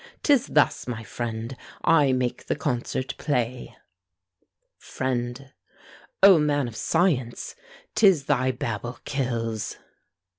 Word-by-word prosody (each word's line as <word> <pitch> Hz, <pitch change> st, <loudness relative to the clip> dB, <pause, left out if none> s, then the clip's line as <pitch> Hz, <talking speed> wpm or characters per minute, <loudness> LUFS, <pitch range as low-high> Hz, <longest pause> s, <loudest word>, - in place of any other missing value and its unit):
'Tis 280 Hz, -4 st, +4 dB
thus, 150 Hz, -4 st, +2 dB
my 115 Hz, -2 st, -4 dB
friend, 115 Hz, +3 st, -5 dB, 0.3 s
I 150 Hz, -5 st, +4 dB
make 125 Hz, -1 st, -2 dB
the -, -, 0 dB
concert 130 Hz, -1 st, -2 dB
play. 125 Hz, -4 st, -2 dB, 1.0 s
FRIEND. 130 Hz, +1 st, -4 dB, 0.7 s
O 195 Hz, -4 st, +9 dB
man 145 Hz, -3 st, +1 dB
of 115 Hz, -, -8 dB
science! 140 Hz, -5 st, 0 dB, 0.4 s
'tis 190 Hz, -10 st, +4 dB
thy 130 Hz, 0 st, +2 dB
babble 120 Hz, 0 st, -4 dB
kills! 115 Hz, -5 st, -2 dB
130 Hz, 105 wpm, -25 LUFS, 120-145 Hz, 1.0 s, O